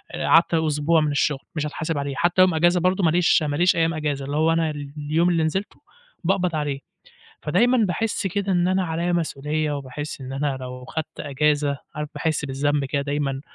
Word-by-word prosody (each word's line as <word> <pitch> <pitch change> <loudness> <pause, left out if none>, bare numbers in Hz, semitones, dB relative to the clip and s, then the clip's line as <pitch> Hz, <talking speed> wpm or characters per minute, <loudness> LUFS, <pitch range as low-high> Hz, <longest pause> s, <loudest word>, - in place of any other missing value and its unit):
قعدت 170 +1 +3
أسبوع 160 0 +2
من 150 -1 0
الشغل 145 -1 0
مش 155 -1 -1
هاتحاسب 160 +1 -3
عليه، 140 -1 -3
حتى 175 +2 +3
يوم 185 -1 +5
أجازة 175 +3 +3
برضه، 185 +2 +1
ما 160 - +4
ليش 170 -1 +3
ما 145 -1 -1
ليش 175 +4 +3
أيام 165 0 +2
أجازة، 145 -3 -2
اللي 145 +2 -3
هو 160 +1 +3
أنا 165 -1 +1
ال 145 -1 -8
اليوم 155 +4 +1
اللي 165 -2 +2
نزلته، 190 +6 -3 0.4
باقبض 180 -1 +1
عليه، 145 -2 -2 0.6
فدايمًا 245 +2 +3
باحِس 210 +2 -1
كده 200 +1 -2
إن 175 -1 +2
أنا 185 0 +1
عليّا 170 +1 -1
مسؤولية، 155 -2 -1
وباحِس 140 +2 -6
إن 130 0 -6
أنا 140 0 -1
لو 125 0 -7
خدت 160 +3 -6
أجازة 145 0 +1 0.2
عارف 150 0 -4
باحِس 155 -2 -1
بالذنب 140 +1 0
كده 140 +1 -1
دايمًا، 140 -1 -2
155 Hz, 195 wpm, -23 LUFS, 145-170 Hz, 0.6 s, يوم